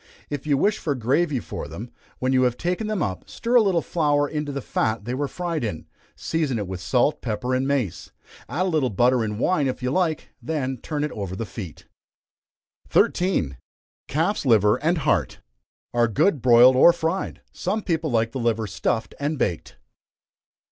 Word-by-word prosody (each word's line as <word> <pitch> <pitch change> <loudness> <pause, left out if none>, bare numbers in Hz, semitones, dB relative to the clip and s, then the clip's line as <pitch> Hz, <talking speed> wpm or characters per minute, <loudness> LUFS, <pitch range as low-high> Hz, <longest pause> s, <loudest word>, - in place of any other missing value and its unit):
If 145 0 -4
you 145 -2 +3
wish 205 +8 +2
for 145 -3 -1
gravy 135 +4 +1
for - - -6
them, 120 +4 -8 0.3
when 130 +1 0
you 130 - +4
have 125 -1 +1
taken 180 +5 -2
them 215 -6 -1
up, 95 -2 -4
stir 235 - -3
a 245 - +7
little 190 -6 +2
flour 145 -3 +1
into 150 -1 -3
the 140 - -3
fat 110 -4 -1
they 120 - -3
were 140 +2 -1
fried 170 -2 -3
in; 85 -9 -4 0.3
season 155 -7 -1
it 105 - -2
with 95 -1 -6
salt, 125 - +1
pepper, 120 +2 -2
and 130 +1 +1
mace. 135 -11 -1 0.4
Add 180 +5 0
a - - 0
little 155 -7 +1
butter 120 +3 +3
and 105 -1 -3
wine 150 -1 +2
if 130 0 -4
you 125 - 0
like, 165 -2 0
then 135 -5 -2
turn 150 +4 -3
it 150 - -2
over 100 -3 -5
the 115 - -4
feet. 100 -6 -9 1.0
13. 130 - +2 0.5
Calf's 165 +8 0
Liver 110 -5 +4
and 165 +4 +1
Heart. 155 -2 0 0.5
Are 120 -1 +3
good, 135 - +2
broiled 125 +1 +7
or 170 +6 +7
fried. 165 +4 -2
Some 215 0 -2
people 165 -3 -1
like 115 -2 +1
the 130 - -4
liver 115 -2 0
stuffed 110 +2 -2
and 145 +2 -1
baked. 85 -10 -2
135 Hz, 185 wpm, -24 LUFS, 115-160 Hz, 1.0 s, a